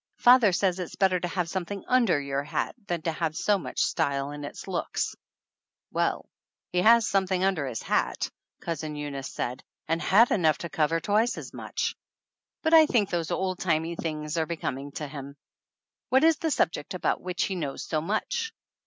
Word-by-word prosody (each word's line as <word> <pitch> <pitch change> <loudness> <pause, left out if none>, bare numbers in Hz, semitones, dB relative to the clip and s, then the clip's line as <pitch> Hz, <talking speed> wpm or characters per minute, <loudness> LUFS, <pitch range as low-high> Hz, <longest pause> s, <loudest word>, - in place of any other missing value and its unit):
Father 245 -4 +6
says 185 0 +1
it's 180 - -5
better 190 -2 +3
to 175 - -2
have 175 -1 -1
something 190 +3 -4
under 235 - +3
your 140 0 -2
hat 150 +2 -2
than 170 -2 -2
to 165 - 0
have 160 -1 -2
so 205 +3 +2
much - - -5
style 140 -3 0
in 145 0 -7
its 145 - -8
looks - - -2 0.4
!" - - -66
"Well, - - 0 0.5
he 180 - +1
has 230 +2 +6
something 190 -1 +1
under 185 -8 +1
his 115 -4 -4
hat," - - 0 0.3
Cousin 155 -2 -4
Eunice 140 -2 -5
said, 125 +1 -4 0.2
"and 165 +1 0
hat 210 +9 +5
enough 160 -6 +3
to 170 - -6
cover 165 -2 +1
twice 215 +7 +1
as - - -8
much. - - -3 0.7
But 320 0 +2
I 320 -1 +8
think 210 -8 +2
those 170 -3 -1
old 185 -1 -1
timey 165 -1 0
things 155 -1 -3
are 160 - 0
becoming 145 -4 -4
to 150 - -4
him!" 140 -1 -8 0.7
"What 265 +3 +4
is 325 -1 +5
the 325 - -1
subject 185 - 0
about 185 - 0
which 180 +1 -2
he 195 - -1
knows 150 -7 -4
so 155 -2 -1
much?" 220 - -2
170 Hz, 190 wpm, -27 LUFS, 150-195 Hz, 0.7 s, I